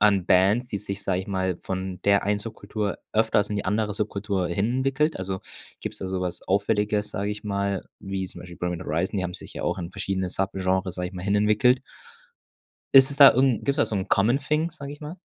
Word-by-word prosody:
an 100 -3 +4
Bands, 100 +7 +4
die 105 - -3
sich, 100 0 -5
sage 95 -1 0
ich 95 - -8
mal, 95 -3 -1
von 95 -1 -4
der 100 -1 +3
einen 105 0 +1
Subkultur 105 -1 -4
öfters 110 -2 +2
in 105 - -2
die 100 - -2
andere 105 +1 0
Subkultur 100 -3 -1
hin 100 +6 0
entwickelt? 135 +4 +1
Also, 95 0 -4 0.4
gibt's - - -5
da 95 - -4
so 95 0 -2
was 90 -1 -3
Auffälliges, 105 +1 0
sage 100 +1 -2
ich 105 0 -6
mal, 100 -2 -1 0.2
wie 95 -1 -3
zum - - -11
Beispiel 90 -1 -10
Bring 90 - -1
Me - - -3
The - - -8
Horizon, 85 +6 -1
die 95 - 0
haben 90 0 -3
sich - - -9
ja - - -5
auch - - -1
in 85 -1 -5
verschiedene 95 -1 -2
Subgenres, 95 0 -1
sage 90 -1 -3
ich 95 - -14
mal, 90 - -6
hinentwickelt. 105 +6 +3 1.1
Ist 135 0 +8
es 140 - -7
da 140 -1 +10
irgend 130 -3 +2
gibt's 140 0 +2
da - - +4
so - - -4
'n 95 - -3
common 115 +7 +3
thing, 150 +3 0
sage 140 -4 -8
ich 145 - -12
mal? 155 +4 -7
100 Hz, 230 wpm, -25 LUFS, 95-110 Hz, 1.1 s, da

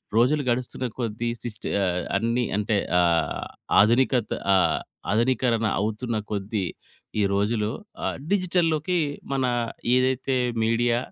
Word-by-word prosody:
రోజులు 140 +5 +3
గడుస్తున్న 125 +1 -1
కొద్ది, 115 0 -2
సిస్ట్ 110 -3 -7 0.2
ఆహ్, 90 -1 0
అన్ని 115 +3 0
అంటే 105 0 +1 0.2
ఆహ్, 85 -1 +1 0.3
ఆధునికత 120 +2 +3 0.2
ఆహ్, 95 -2 +3 0.3
ఆధునీకరణ 115 0 +2
అవుతున్న 110 +3 -2
కొద్ది 100 -1 -2 0.6
ఈ - - +3
రోజులు 105 +2 +1 0.3
ఆహ్, - - -1
డిజిటల్‌లోకి 180 -3 +1 0.4
మన 135 -1 +1 0.5
ఏదైతే 130 +1 +1 0.3
మీడియా 115 +1 +2
115 Hz, 110 wpm, -25 LUFS, 105-130 Hz, 0.6 s, రోజులు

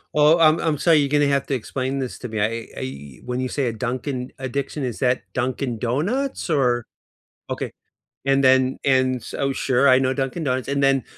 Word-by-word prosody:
Oh, 150 +3 +6
I'm 160 0 +5
I'm 155 -3 0
sorry, 165 +1 +4
you're 140 - +1
gonna 145 0 +3
have 140 -1 +1
to 135 - 0
explain 130 +3 -3
this 130 -2 -4
to 125 - -5
me, 110 -1 -3
I 115 +2 -1
I 70 +1 -7
when 125 0 -3
you 130 - -2
say 140 0 -1
a 115 - -1
"Dunkin' 125 +2 -3
addiction," 135 +2 -3
is 120 -4 -3
that 125 -1 +1
Dunkin' 125 -2 -2
Donuts 185 - -1
or 125 -5 +2 0.6
Okay, - - -4 0.5
and 135 0 +3
then 130 0 +4
and 130 -1 +3
s - - -10
Oh, 135 - 0
sure, 135 0 +2
I 130 0 +6
know 130 0 +1
Dunkin' 135 +4 -3
Donuts, 130 -1 -1
and 140 0 0
then 135 -3 +3
130 Hz, 205 wpm, -22 LUFS, 125-140 Hz, 0.6 s, Oh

